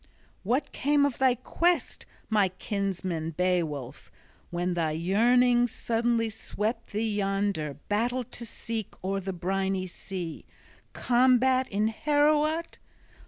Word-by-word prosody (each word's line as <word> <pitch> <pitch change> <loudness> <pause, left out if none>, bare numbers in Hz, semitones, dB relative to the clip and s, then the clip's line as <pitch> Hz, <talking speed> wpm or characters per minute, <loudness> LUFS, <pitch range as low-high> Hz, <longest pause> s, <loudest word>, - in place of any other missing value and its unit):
"What 260 +8 0
came 285 +1 +2
of 280 -4 -2
thy 260 -2 +4
quest, 340 +8 0 0.2
my 205 -4 +3
kinsman 185 -4 -3
Beowulf, 160 -8 -1 0.4
when 175 +1 -1
thy 165 -3 0
yearnings 240 +8 +3
suddenly 230 0 0
swept 220 +1 -3
thee 215 0 -1
yonder 195 -7 -1
battle 240 +5 0
to 235 - -9
seek 225 -1 -5
o'er 195 +1 -1
the 190 0 -4
briny 190 +1 -1
sea, 180 -2 -7 0.5
combat 255 +1 +3
in 210 +2 0
Heorot? 300 +5 +1
215 Hz, 115 wpm, -28 LUFS, 185-245 Hz, 0.5 s, thy